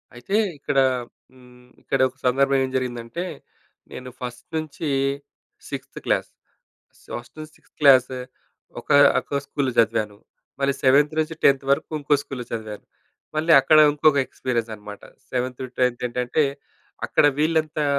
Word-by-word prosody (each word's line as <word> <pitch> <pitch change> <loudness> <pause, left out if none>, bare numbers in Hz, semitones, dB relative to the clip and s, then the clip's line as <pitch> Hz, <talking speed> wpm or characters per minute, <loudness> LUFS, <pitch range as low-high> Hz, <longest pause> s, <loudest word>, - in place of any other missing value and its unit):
అయితే 120 +12 -4 0.2
ఇక్కడ 140 0 -3 0.6
హ్మ్, 125 -1 -19
ఇక్కడ - - -1
ఒక 130 - -24
సందర్భం 135 +2 +3
ఏం 130 - -7
జరిగిందంటే. 120 +5 -4 0.7
నేను 125 0 -8
ఫస్ట్ 125 -1 -7
నుంచి 155 0 -4 0.8
6త్ - - -7
క్లాస్, - - 0 0.9
ఫస్ట్ 120 0 -15
నుంచి 155 0 -9
6త్ - - -32
క్లాస్ 130 -3 +7 0.7
ఒక, - - -20 0.3
ఒక 140 - -3
స్కూల్‌లో 140 -2 -2
చదివాను. 110 -2 +1 0.4
మళ్ళీ 140 0 +1
7త్ 145 +3 +4
నుంచి 155 +1 -1
10త్ 135 -1 +4
వరకు 140 - +1
ఇంకో 145 +1 +2
స్కూల్‌లో 130 -4 -7
చదివాను. 110 -2 -6 0.5
మళ్ళీ 160 +2 +2
అక్కడ 155 +4 +5
ఇంకొక 150 0 +3
ఎక్స్‌పీరియన్స్ 120 -3 -3
అన్నమాట. 105 -1 -11 0.3
7త్ 125 0 -2
టూ - - -3
10త్ 125 -1 +1
ఏంటంటే 125 +5 0 0.6
అక్కడ - - +2
వీళ్ళంతా 155 -1 +1
130 Hz, 135 wpm, -23 LUFS, 125-145 Hz, 0.9 s, క్లాస్